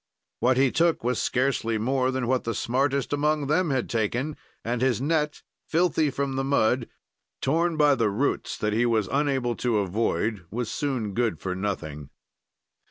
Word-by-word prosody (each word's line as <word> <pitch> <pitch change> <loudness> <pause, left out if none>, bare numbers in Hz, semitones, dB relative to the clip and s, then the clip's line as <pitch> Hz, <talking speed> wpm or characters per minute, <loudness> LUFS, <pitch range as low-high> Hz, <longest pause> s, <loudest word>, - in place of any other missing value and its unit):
"What 125 +2 +3
he 135 -1 +4
took 170 -5 +2
was 125 0 0
scarcely 125 -3 0
more 130 +3 +1
than 130 -1 -1
what 130 +1 +1
the 115 -2 -2
smartest 135 +5 0
among 150 0 +1
them 155 +4 +1
had 130 -3 0
taken, 120 +7 -1 0.3
and 120 +1 -1
his 130 -4 +2
net, 150 +1 0 0.2
filthy 160 -2 +2
from 135 0 -2
the 135 - 0
mud, 130 -3 +2 0.5
torn 165 +3 +1
by 150 -1 +5
the 115 -5 +1
roots 120 +8 -1
that 105 0 -1
he 120 +3 +2
was 110 -4 +1
unable 135 -4 +1
to 120 -3 +1
avoid, 105 0 -1
was 115 +2 -3
soon 130 -8 -2
good 115 0 0
for 95 - -3
nothing." 80 -8 -4
130 Hz, 165 wpm, -26 LUFS, 115-140 Hz, 0.5 s, by